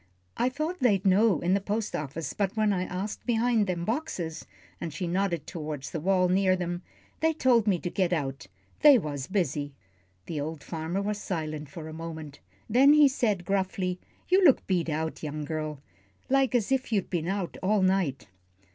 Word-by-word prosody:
I 245 - +1
thought 310 +7 -3
they'd 205 -8 +2
know 195 -2 +4
in 175 +2 +2
the 200 - +2
post 210 +2 -2
office, 150 +1 -4
but 200 +1 -1
when 215 -1 +3
I 185 -1 -1
asked 195 +3 -5
behind 230 -2 +2
them 175 -2 -2
boxes," 190 - -3 0.3
and 170 - -4
she 175 +4 -4
nodded 175 -2 -1
toward 150 -4 -5
the 160 - -4
wall 185 +2 +2
near 185 +1 +3
them, 175 -1 -3 0.4
"they 320 0 +2
told 245 -7 +3
me 195 -3 +3
to 175 - -4
get 185 -3 +1
out 135 - -2 0.3
they 290 -3 +8
was 145 - -4
busy." 145 -7 -1 0.5
The 155 -4 -3
old 155 0 -5
farmer 165 +4 -3
was 210 0 -2
silent 155 -4 -4
for 155 +2 -8
a 160 - -8
moment. 160 -3 -7 0.3
Then 265 +6 +6
he 300 -1 +7
said, 215 -9 0
gruffly, 190 -1 -1 0.3
"You 375 +1 +4
look 290 -7 +5
beat 175 -3 0
out, 160 +1 -2
young 150 -1 -4
girl, 155 -1 -4 0.5
like 270 -1 +3
as 235 0 +1
if 265 -2 0
you'd 200 -4 0
been 170 -3 -1
out 190 -2 -2
all 200 +1 +2
night." 185 - +1
185 Hz, 185 wpm, -28 LUFS, 160-215 Hz, 0.5 s, they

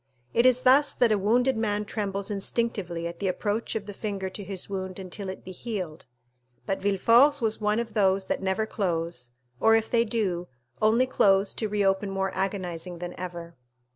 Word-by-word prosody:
It 235 +2 +5
is 255 0 +3
thus 275 +3 +5
that 240 -3 +3
a 215 - +4
wounded 245 +6 +3
man 210 -2 -1
trembles 200 -1 -3
instinctively 195 -4 -2
at 170 0 -5
the 200 - -1
approach 205 +5 -2
of 215 -2 -2
the 205 - -7
finger 195 -2 -4
to 200 - -7
his 190 -1 -5
wound 190 -2 -4
until 190 +1 -6
it 190 - -8
be 185 - -7
healed, 185 -5 -5 0.6
but 195 -1 -1
Villefort's 230 +9 +5
was 220 -2 -1
one 210 0 +2
of 235 -2 -4
those 195 -2 +2
that - - -2
never 190 +3 0
close, 170 - -2 0.3
or 225 0 +5
if 225 0 0
they 230 -1 +4
do, 200 -7 -1 0.3
only 225 +4 +4
close 195 -5 +3
to 220 - -2
reopen 200 -1 +1
more 195 -1 -1
agonizing 185 -3 -3
than 175 +1 -6
ever. 170 -2 -7
200 Hz, 185 wpm, -27 LUFS, 185-220 Hz, 0.6 s, It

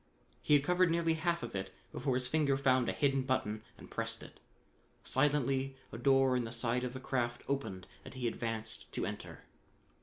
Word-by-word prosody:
He 150 - +5
had 140 - +4
covered 180 +2 +4
nearly 165 0 +2
half 170 +1 0
of - - -5
it 95 -1 -3 0.2
before 135 -3 -1
his 125 0 0
finger 140 0 +2
found 130 -2 +3
a - - +2
hidden 135 -2 +2
button 120 -5 -1 0.2
and - - -13
pressed - - -2
it. - - -13 0.6
Silently 135 -1 +1 0.2
a 110 - -6
door 135 0 +4
in 125 - +1
the 115 - -5
side 120 +1 0
of 125 -1 -3
the 130 - -5
craft 120 -3 -1
opened 115 -10 -2 0.2
and - - -10
he 125 -2 -1
advanced 115 -1 -3
to - - -1
enter. - - -6
130 Hz, 190 wpm, -34 LUFS, 120-145 Hz, 0.6 s, He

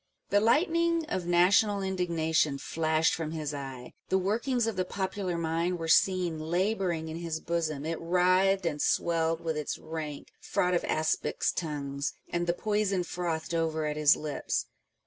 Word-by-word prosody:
The 205 - +5
lightning 330 - +2
of 180 -2 -2
national 195 +4 +4
indignation 165 -6 0
flashed 160 +2 +1
from 165 -3 -3
his 150 -2 -3
eye; 135 -3 -7 0.2
the 190 - +3
workings 230 +6 0
of 225 -2 -2
the 185 - +1
popular 190 -1 -3
mind 170 +2 0
were 165 -1 -4
seen 175 -1 +3
labouring 175 0 -1
in 160 +1 -5
his 165 -2 -3
bosom: 160 -4 -2
it 165 0 -3
writhed 185 +2 +3
and 150 -3 -1
swelled 165 -1 +1
with 160 -1 -2
its 150 - -3
rank 155 -2 -6
" - - -41
fraught 180 0 +2
of 175 - +2
aspics' 155 0 0
tongues," 145 -4 -3
and 175 0 -2
the 170 - +2
poison 205 -1 0
frothed 170 -2 -3
over 160 -1 0
at 150 0 -1
his 150 0 +5
lips. 150 -1 -2
170 Hz, 165 wpm, -29 LUFS, 160-190 Hz, 0.2 s, The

